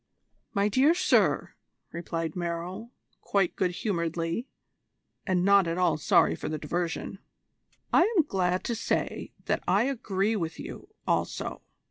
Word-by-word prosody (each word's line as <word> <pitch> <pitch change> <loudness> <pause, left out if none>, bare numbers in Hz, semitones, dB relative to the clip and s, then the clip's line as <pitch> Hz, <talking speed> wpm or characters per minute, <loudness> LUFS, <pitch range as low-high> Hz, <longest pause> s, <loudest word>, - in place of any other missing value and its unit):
"My 200 +1 +3
dear 270 +10 +4
sir," - - +2 0.4
replied 165 -2 -4
Merrill 175 +5 -4 0.3
quite 195 -3 +1
good 185 - +1
humouredly, 170 - -2 0.8
and 185 -2 +2
not 200 -2 +5
at 165 +1 -1
all 180 -4 +3
sorry 150 - +4
for - - -5
the 155 - -2
diversion, 170 +4 -3 0.7
"I 380 +6 +5
am 330 - +6
glad 185 -8 0
to 235 - -1
say 230 - -2
that - - 0
I - - +4
agree 220 -5 0
with 165 -5 -3
you - - -8 0.2
also. - - -1
185 Hz, 135 wpm, -28 LUFS, 170-210 Hz, 0.8 s, am